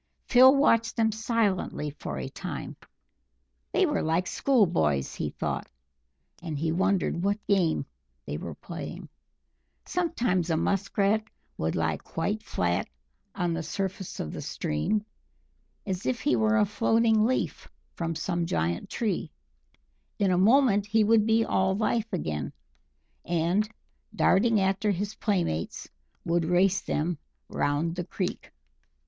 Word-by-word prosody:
Phil 260 Hz, +2 st, +7 dB
watched 230 Hz, -5 st, +3 dB
them 225 Hz, -1 st, +2 dB
silently 215 Hz, -8 st, -1 dB
for 145 Hz, -, -6 dB
a -, -, -4 dB
time. -, -, -6 dB, 1.0 s
They 385 Hz, -, +3 dB
were 300 Hz, -, 0 dB
like 165 Hz, +3 st, +1 dB
school 255 Hz, +1 st, +3 dB
boys, 75 Hz, -, 0 dB
he -, -, -3 dB
thought, -, -, -4 dB, 0.7 s
and 160 Hz, -4 st, -4 dB
he 160 Hz, +2 st, 0 dB
wondered 190 Hz, -1 st, +1 dB
what 205 Hz, +1 st, -1 dB
game 185 Hz, -6 st, +2 dB, 0.4 s
they -, -, -4 dB
were -, -, -6 dB
playing. -, -, -8 dB, 0.8 s
Sometimes 240 Hz, -, 0 dB
a 160 Hz, -, +2 dB
Musk 195 Hz, +4 st, -1 dB
Rat 210 Hz, +2 st, +3 dB, 0.3 s
would 80 Hz, +1 st, -2 dB
lie 80 Hz, -2 st, 0 dB
quite 200 Hz, -, -3 dB
flat 90 Hz, -, -1 dB, 0.5 s
on 175 Hz, -2 st, 0 dB
the 165 Hz, -, -2 dB
surface 190 Hz, +3 st, -4 dB
of 75 Hz, -, -4 dB
the -, -, -5 dB
stream, 205 Hz, -, -1 dB, 0.8 s
as 190 Hz, -2 st, -3 dB
if 245 Hz, -3 st, -1 dB
he 295 Hz, -, +2 dB
were 220 Hz, 0 st, +3 dB
a 210 Hz, -, +4 dB
floating 225 Hz, +1 st, +3 dB
leaf 255 Hz, +3 st, -1 dB, 0.2 s
from 165 Hz, -1 st, -3 dB
some 170 Hz, 0 st, -1 dB
giant 85 Hz, -, -1 dB
tree; 215 Hz, -6 st, -2 dB, 0.9 s
in 195 Hz, -2 st, +2 dB
a -, -, +3 dB
moment 210 Hz, +1 st, +4 dB
he 220 Hz, +1 st, +3 dB
would 220 Hz, 0 st, +4 dB
be 225 Hz, 0 st, +3 dB
all 190 Hz, 0 st, +1 dB
life 225 Hz, +1 st, 0 dB
again, 75 Hz, -, -3 dB, 0.7 s
and, 175 Hz, +5 st, +1 dB, 0.5 s
darting 220 Hz, +2 st, +4 dB
after 195 Hz, +2 st, +1 dB
his 205 Hz, +2 st, -1 dB
playmates, 180 Hz, -, -2 dB, 0.4 s
would 170 Hz, 0 st, +1 dB
race 180 Hz, +3 st, +3 dB
them 160 Hz, 0 st, -2 dB, 0.3 s
round 150 Hz, +4 st, 0 dB
the 180 Hz, -, -2 dB
creek. 185 Hz, 0 st, -4 dB
195 Hz, 140 wpm, -27 LUFS, 165-220 Hz, 1.0 s, Phil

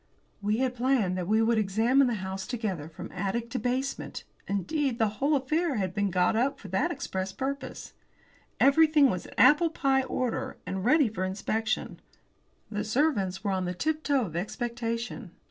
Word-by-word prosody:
We 210 Hz, +2 st, +1 dB
had 255 Hz, 0 st, 0 dB
planned 245 Hz, -7 st, +1 dB
that 175 Hz, -, -3 dB
we 220 Hz, +2 st, +3 dB
would 225 Hz, 0 st, +3 dB
examine 225 Hz, +7 st, +3 dB
the 240 Hz, -, 0 dB
house 190 Hz, -1 st, -5 dB
together 200 Hz, -, -3 dB
from 165 Hz, -, -9 dB
attic 200 Hz, +5 st, -3 dB
to 255 Hz, -, -1 dB
basement; 255 Hz, +2 st, -2 dB, 0.2 s
indeed, 235 Hz, -, -1 dB
the 225 Hz, -2 st, +3 dB
whole 290 Hz, +2 st, +3 dB
affair 305 Hz, +3 st, 0 dB
had 190 Hz, -4 st, -1 dB
been 205 Hz, 0 st, 0 dB
got 180 Hz, +2 st, +2 dB
up 265 Hz, +5 st, +1 dB
for 200 Hz, -, -10 dB
that 190 Hz, +2 st, +1 dB
express 190 Hz, 0 st, -3 dB
purpose. 270 Hz, +8 st, -5 dB, 0.7 s
Everything 295 Hz, -1 st, +5 dB
was 180 Hz, -, -4 dB
in -, -, -13 dB
apple 295 Hz, +6 st, +6 dB
pie 270 Hz, -4 st, +2 dB
order 255 Hz, -2 st, -2 dB
and 190 Hz, 0 st, -3 dB
ready 275 Hz, +4 st, +4 dB
for 210 Hz, -4 st, -4 dB
inspection. 215 Hz, +4 st, -2 dB, 0.7 s
The 210 Hz, -1 st, -2 dB
servants 215 Hz, -6 st, 0 dB
were 200 Hz, -, 0 dB
on 185 Hz, -1 st, -1 dB
the 180 Hz, 0 st, -3 dB
tiptoe 290 Hz, -, 0 dB
of 165 Hz, -4 st, -8 dB
expectation. 230 Hz, +1 st, -4 dB
230 Hz, 170 wpm, -28 LUFS, 195-265 Hz, 0.7 s, apple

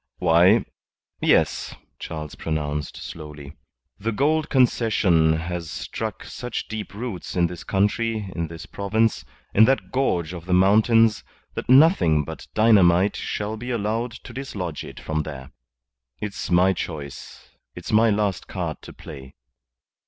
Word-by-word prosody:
"Why, 90 Hz, +7 st, +4 dB, 0.6 s
yes," -, -, +2 dB, 0.2 s
Charles 75 Hz, -2 st, -6 dB
pronounced, 75 Hz, -2 st, -3 dB
slowly. 75 Hz, -2 st, -9 dB, 0.5 s
"The 110 Hz, +3 st, -1 dB
Gould 150 Hz, +6 st, +1 dB
Concession 105 Hz, -, +3 dB
has 85 Hz, +1 st, -4 dB
struck -, -, -5 dB
such 125 Hz, 0 st, -5 dB
deep 110 Hz, -1 st, -6 dB
roots 110 Hz, -5 st, -5 dB
in 90 Hz, -1 st, +3 dB
this 85 Hz, 0 st, -5 dB
country, 105 Hz, +1 st, 0 dB
in 85 Hz, -1 st, -2 dB
this 80 Hz, 0 st, -9 dB
province, 105 Hz, -, 0 dB, 0.3 s
in 110 Hz, -, +7 dB
that 135 Hz, +3 st, 0 dB
gorge 90 Hz, -11 st, 0 dB
of 85 Hz, -2 st, -8 dB
the 90 Hz, -, +3 dB
mountains, 110 Hz, +2 st, +4 dB, 0.3 s
that -, -, -6 dB
nothing 130 Hz, -, +5 dB
but -, -, -9 dB
dynamite 100 Hz, -3 st, +5 dB
shall 105 Hz, +1 st, -3 dB
be 120 Hz, +3 st, -7 dB
allowed 115 Hz, +1 st, -1 dB
to 125 Hz, -, -10 dB
dislodge 100 Hz, -, -5 dB
it -, -, -10 dB
from 80 Hz, 0 st, -2 dB
there. 70 Hz, -3 st, -8 dB, 0.7 s
It's 105 Hz, -2 st, -5 dB
my 90 Hz, +2 st, +4 dB
choice. 75 Hz, -5 st, -7 dB, 0.3 s
It's -, -, -7 dB
my 110 Hz, +1 st, +5 dB
last 100 Hz, -3 st, 0 dB
card -, -, -4 dB
to -, -, -11 dB
play." 65 Hz, 0 st, -11 dB
95 Hz, 135 wpm, -23 LUFS, 80-115 Hz, 0.7 s, in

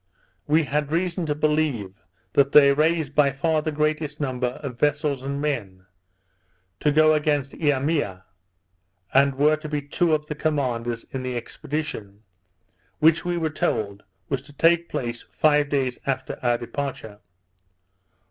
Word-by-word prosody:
We 155 Hz, +2 st, +4 dB
had 150 Hz, 0 st, -2 dB
reason 175 Hz, 0 st, -1 dB
to 150 Hz, -, 0 dB
believe 150 Hz, -10 st, -1 dB, 0.3 s
that 140 Hz, 0 st, +3 dB
they 140 Hz, -1 st, +8 dB
raised 155 Hz, 0 st, +1 dB
by 145 Hz, -2 st, +4 dB
far 155 Hz, +3 st, 0 dB
the 155 Hz, 0 st, -2 dB
greatest 150 Hz, 0 st, -1 dB
number 130 Hz, -3 st, -1 dB, 0.2 s
of 125 Hz, -4 st, -6 dB
vessels 145 Hz, -2 st, +1 dB
and 140 Hz, +1 st, -4 dB
men, 105 Hz, -11 st, -3 dB, 0.9 s
to 150 Hz, -, +2 dB
go 155 Hz, +1 st, +5 dB
against 150 Hz, -3 st, 0 dB
Eimea, 145 Hz, -, 0 dB, 0.9 s
and 140 Hz, 0 st, +4 dB
were 150 Hz, +3 st, +3 dB
to 155 Hz, 0 st, -8 dB
be 150 Hz, -1 st, -2 dB
two 160 Hz, +3 st, +1 dB
of 150 Hz, 0 st, -4 dB
the 150 Hz, -, -4 dB
commanders 125 Hz, -7 st, -2 dB
in 135 Hz, -, -4 dB
the 125 Hz, -1 st, -3 dB
expedition, 115 Hz, -5 st, -5 dB, 0.7 s
which 160 Hz, +1 st, +4 dB
we 175 Hz, 0 st, -1 dB
were 160 Hz, -2 st, -1 dB
told 100 Hz, -8 st, -2 dB, 0.3 s
was 135 Hz, -2 st, -2 dB
to 145 Hz, +1 st, -16 dB
take 170 Hz, +3 st, +3 dB
place 120 Hz, -1 st, -3 dB
five 150 Hz, -1 st, +2 dB
days 130 Hz, -3 st, -1 dB
after 130 Hz, -1 st, -2 dB
our 120 Hz, -1 st, +2 dB
departure. 120 Hz, -4 st, -5 dB
145 Hz, 145 wpm, -24 LUFS, 130-155 Hz, 0.9 s, they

